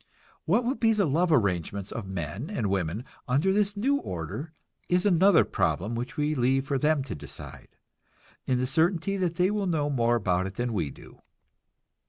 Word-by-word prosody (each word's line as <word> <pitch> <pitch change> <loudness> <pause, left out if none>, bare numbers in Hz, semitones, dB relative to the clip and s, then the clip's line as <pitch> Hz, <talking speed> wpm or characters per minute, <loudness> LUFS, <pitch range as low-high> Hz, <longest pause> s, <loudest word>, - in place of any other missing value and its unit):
What 210 +9 +3
will 245 +3 +1
be 225 -4 +2
the 205 -3 +2
love 165 +4 +1
arrangements 100 - 0
of 115 -4 -5
men 95 - -5
and 105 -5 -1
women 95 +5 -2 0.2
under 145 +10 +2
this 205 0 +1
new 275 +7 +2
order 90 - -5 0.4
is 180 +2 +2
another 190 -1 +5
problem 105 +6 -1
which 120 +6 -5
we 150 +1 +1
leave 135 0 +1
for 135 -1 -1
them 150 -1 +2
to 130 - -6
decide, 75 - -11 0.7
in 130 - +2
the 125 - 0
certainty 165 +7 +1
that 180 -3 -1
they 180 +3 +2
will 205 -2 -1
know 150 -4 0
more 120 -3 +2
about 95 -4 0
it 95 - -9
than 120 +1 -2
we 85 -8 -1
do. - - -15
140 Hz, 185 wpm, -27 LUFS, -, 0.7 s, another